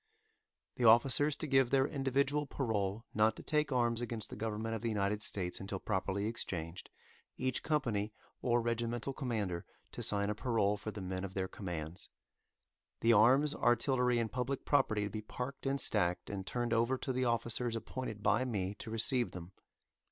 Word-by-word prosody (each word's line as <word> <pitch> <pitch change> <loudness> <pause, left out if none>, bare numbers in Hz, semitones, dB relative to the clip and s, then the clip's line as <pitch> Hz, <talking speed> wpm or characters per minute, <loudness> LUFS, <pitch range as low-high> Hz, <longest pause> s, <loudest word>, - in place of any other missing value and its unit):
The 125 - +1
officers 135 +6 +5
to - - -4
give 135 -3 +3
their 135 0 +4
individual 140 +1 0
parole 110 -5 -1
not 110 +1 +3
to - - -10
take 150 -1 +1
arms 120 -2 +2
against 115 -2 -3
the - - -5
government 110 0 -3
of 115 - -3
the 115 - -1
United 105 0 0
States 90 -4 -1
until 95 0 -4
properly 95 0 -1
exchanged, 90 -6 -4 0.5
each 130 -1 0
company 115 -9 0 0.3
or 120 -1 +2
regimental 120 +2 -1
commander 105 -10 -2 0.3
to - - -6
sign 100 0 +1
a - - 0
parole 105 -2 +1
for 105 +1 -6
the 105 -1 -6
men 95 0 -3
of 95 -1 -6
their 95 -1 -1
commands. 85 -3 -6 0.9
The 115 0 +5
arms, 130 +8 +5
artillery, 125 0 +2
and 115 -2 -1
public 125 +2 -2
property 110 -7 +2
to 105 - -2
be 110 - -4
parked 125 +5 -5
and 140 +1 +1
stacked, 90 -4 0
and 95 -2 -5
turned 120 -1 -1
over 115 +3 +2
to 130 - -3
the 130 0 0
officers 115 0 0
appointed 115 -1 -5
by 130 - +3
me 100 -6 -2
to - - -6
receive 120 +2 +1
them. 90 0 -8
115 Hz, 175 wpm, -34 LUFS, 100-130 Hz, 0.9 s, officers